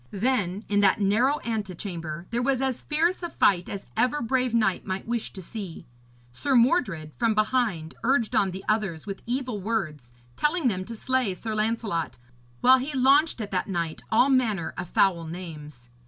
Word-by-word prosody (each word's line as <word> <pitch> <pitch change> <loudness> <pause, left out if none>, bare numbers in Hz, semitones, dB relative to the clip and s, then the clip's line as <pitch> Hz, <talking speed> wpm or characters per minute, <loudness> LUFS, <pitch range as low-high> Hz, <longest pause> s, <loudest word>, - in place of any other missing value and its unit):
Then 205 -3 -1
in 205 0 +2
that 200 +2 +4
narrow 235 +9 +2
antechamber 180 -7 -4
there 235 +1 0
was 265 0 +1
as 265 -2 -1
fierce 330 +5 +1
a 345 - -3
fight 180 - +2
as 200 - -6
ever 255 +4 +2
brave 250 +1 0
knight 220 -5 +1
might 190 +1 -4
wish 235 -1 -2
to 190 - -8
see. 195 -3 -7 0.5
Sir 270 - 0
Mordred 230 - +2
from 230 -2 +2
behind 215 -7 0
urged 240 -2 +1
on 195 - +3
the 190 +1 -7
others 195 -7 -1
with 195 -2 -6
evil 250 -4 -2
words, 155 - -3 0.2
telling 300 -2 +1
them 185 -3 -3
to 230 - -7
slay 255 -4 0
Sir 220 +4 -5
Lancelot; 215 -6 -1 0.4
while 260 +1 +7
he 275 +2 -4
launched 275 +1 +4
at 205 - -5
that 185 - -1
knight 170 -4 -2
all 250 +5 +4
manner 220 -10 +1
of 175 - -6
foul 175 -4 +2
names. 150 -7 -9
215 Hz, 175 wpm, -26 LUFS, 185-255 Hz, 0.5 s, while